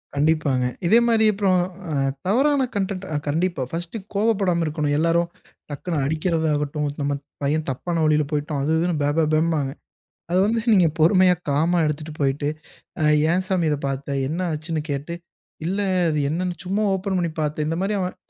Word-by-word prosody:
கண்டிப்பாங்க. 145 Hz, -3 st, +2 dB, 0.2 s
இதே 230 Hz, +6 st, +6 dB
மாரி 225 Hz, -1 st, +4 dB
அப்புறம் 195 Hz, -2 st, +2 dB, 0.3 s
அ -, -, -2 dB, 0.3 s
தவறான 270 Hz, +5 st, +3 dB
கன்டென்ட் 195 Hz, -1 st, -2 dB
ஆ -, -, -1 dB
கண்டிப்பா 165 Hz, +1 st, 0 dB
1டு 175 Hz, +5 st, -4 dB, 0.2 s
கோபப்படாம 200 Hz, -5 st, +1 dB
இருக்கணும். 150 Hz, -1 st, -1 dB
எல்லாரும் 170 Hz, +2 st, +2 dB, 0.4 s
டக்குனு 160 Hz, +3 st, -3 dB
அடிக்கிறதாகட்டும், 155 Hz, -2 st, 0 dB
"நம்ம 140 Hz, 0 st, 0 dB, 0.3 s
பையன் 150 Hz, +2 st, 0 dB
தப்பான 165 Hz, +6 st, -2 dB
வழியில 150 Hz, 0 st, +3 dB
போய்ட்டான்" 150 Hz, -1 st, -1 dB
அது 155 Hz, -, 0 dB
இதுன்னு 170 Hz, 0 st, +1 dB
பே 145 Hz, -, +2 dB
பே 165 Hz, -, +4 dB
பேம்பாங்க. 155 Hz, -3 st, +1 dB, 0.6 s
அத 180 Hz, -, +1 dB
வந்து 225 Hz, +2 st, +1 dB
நீங்க 180 Hz, -4 st, +5 dB
பொறுமையா, 185 Hz, +3 st, +5 dB, 0.2 s
காமா 160 Hz, +5 st, +2 dB
எடுத்துட்டு 150 Hz, +1 st, -3 dB
போய்ட்டு, 145 Hz, +1 st, 0 dB, 0.5 s
அ -, -, +2 dB, 0.3 s
"ஏன் 185 Hz, +1 st, +1 dB
சாமி 185 Hz, -3 st, +1 dB
இத 150 Hz, -, +1 dB
பாத்த?" 135 Hz, +1 st, -4 dB, 0.2 s
என்ன 160 Hz, +5 st, -3 dB
ஆச்சுன்னு? 155 Hz, 0 st, -3 dB
கேட்டு, 145 Hz, +4 st, -3 dB, 0.5 s
"இல்ல, 195 Hz, +4 st, -1 dB, 0.3 s
அது 150 Hz, -, 0 dB
என்னான்னு 175 Hz, +2 st, -2 dB
சும்மா 200 Hz, +4 st, 0 dB
ஓப்பன் 190 Hz, 0 st, -1 dB
பண்ணி 170 Hz, -2 st, -1 dB
பாத்தேன்" 150 Hz, 0 st, -1 dB
இந்த 165 Hz, -, -1 dB
மாரி 205 Hz, +1 st, 0 dB
அவன் 180 Hz, -1 st, -3 dB
165 Hz, 165 wpm, -23 LUFS, 150-185 Hz, 0.6 s, இதே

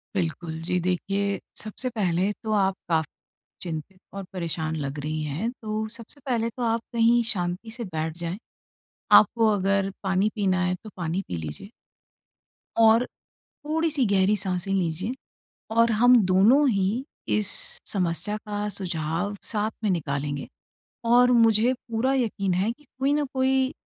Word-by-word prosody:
बिल्कुल। 165 Hz, -2 st, -2 dB
जी 180 Hz, +1 st, 0 dB
देखिए 195 Hz, +2 st, -1 dB, 0.2 s
सबसे 235 Hz, +4 st, -4 dB
पहले 195 Hz, -3 st, 0 dB
तो 215 Hz, -, -2 dB
आप 190 Hz, 0 st, +2 dB
का 160 Hz, -1 st, +3 dB, 0.6 s
चिंतित 175 Hz, +2 st, -6 dB
और 195 Hz, 0 st, -5 dB
परेशान 160 Hz, -3 st, -2 dB
लग 145 Hz, -1 st, -4 dB
रही 155 Hz, +1 st, -3 dB
हैं। 160 Hz, -, -2 dB
तो 215 Hz, 0 st, -2 dB
सबसे 235 Hz, +5 st, -11 dB
पहले 235 Hz, -3 st, 0 dB
तो 245 Hz, +2 st, -6 dB
आप 230 Hz, 0 st, +1 dB
कहीं 235 Hz, +1 st, +4 dB
शांति 180 Hz, +4 st, -3 dB
से 235 Hz, 0 st, -5 dB
बैठ 160 Hz, -3 st, -4 dB
जाएँ। 170 Hz, +2 st, -4 dB, 0.8 s
आपको 225 Hz, +2 st, +1 dB
अगर 195 Hz, 0 st, +1 dB
पानी 190 Hz, +2 st, +2 dB
पीना 190 Hz, -3 st, +1 dB
है 180 Hz, 0 st, +1 dB
तो 215 Hz, -, -8 dB
पानी 175 Hz, +2 st, -2 dB
पी 85 Hz, -, -3 dB
लीजिए। 80 Hz, -, -6 dB, 1.1 s
और 225 Hz, +2 st, +6 dB, 0.4 s
थोड़ी-सी 310 Hz, -2 st, -1 dB
गहरी 200 Hz, +1 st, +3 dB
साँसें 185 Hz, 0 st, -2 dB
लीजिए। 190 Hz, +5 st, -1 dB, 0.6 s
और 230 Hz, +1 st, +4 dB
हम 245 Hz, +3 st, +6 dB
दोनों 215 Hz, +11 st, +5 dB
ही, 205 Hz, +5 st, 0 dB, 0.2 s
इस 210 Hz, -2 st, +1 dB, 0.5 s
समस्या 190 Hz, +3 st, 0 dB
का 210 Hz, -1 st, -4 dB
सुझाव 175 Hz, +1 st, -2 dB
साथ 215 Hz, 0 st, -1 dB
में 210 Hz, -, +2 dB
निकालेंगे। 145 Hz, -4 st, -2 dB, 0.6 s
और 245 Hz, +2 st, +5 dB
मुझे 230 Hz, +1 st, +4 dB
पूरा 240 Hz, +2 st, -1 dB
यकीन 200 Hz, -7 st, 0 dB
है, 195 Hz, +5 st, +1 dB
कि 295 Hz, +5 st, -21 dB
कोई 275 Hz, +2 st, +2 dB
न 295 Hz, 0 st, +2 dB
कोई 265 Hz, +1 st, +2 dB
200 Hz, 145 wpm, -25 LUFS, 175-230 Hz, 1.1 s, और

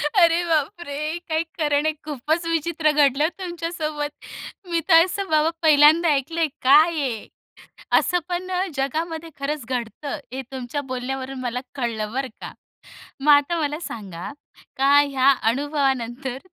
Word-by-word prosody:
अरे, 340 Hz, -1 st, +5 dB
बापरे! 315 Hz, -1 st, -2 dB
काही 320 Hz, +1 st, +1 dB, 0.2 s
खरं 295 Hz, -1 st, +2 dB
नाही, 310 Hz, 0 st, +1 dB
खूपच 310 Hz, +4 st, -2 dB
विचित्र 325 Hz, -1 st, +1 dB
घडलं 290 Hz, 0 st, +3 dB
तुमच्यासोबत. 330 Hz, -4 st, -3 dB, 0.6 s
मी 335 Hz, -1 st, +1 dB
तर 330 Hz, 0 st, +8 dB
असं 390 Hz, 0 st, -4 dB
बाबा 310 Hz, +1 st, +3 dB
पहिल्यांदा 315 Hz, +1 st, +6 dB
ऐकलंय. 320 Hz, +4 st, 0 dB
काय 300 Hz, +6 st, +6 dB
आहे 235 Hz, -6 st, -3 dB, 0.7 s
असं 355 Hz, -, 0 dB
पण 355 Hz, +1 st, -3 dB, 0.3 s
जगामध्ये 320 Hz, +4 st, -3 dB
खरंच 280 Hz, -2 st, -3 dB
घडतं, 255 Hz, +3 st, -4 dB, 0.2 s
हे 265 Hz, -, -3 dB
तुमच्या 265 Hz, +2 st, -4 dB
बोलण्यावरून 260 Hz, +1 st, -4 dB
मला 250 Hz, 0 st, -2 dB, 0.2 s
कळलं 225 Hz, -5 st, -3 dB
बरं 270 Hz, 0 st, -1 dB
का. -, -, -7 dB, 0.7 s
मग 295 Hz, +1 st, +5 dB
आता 290 Hz, +4 st, +3 dB
मला 300 Hz, +2 st, -2 dB
सांगा 195 Hz, -, -7 dB, 0.5 s
का 275 Hz, +2 st, +4 dB
ह्या 275 Hz, -1 st, +3 dB, 0.2 s
अनुभवानंतर 265 Hz, -2 st, -2 dB
295 Hz, 130 wpm, -23 LUFS, 265-325 Hz, 0.7 s, तर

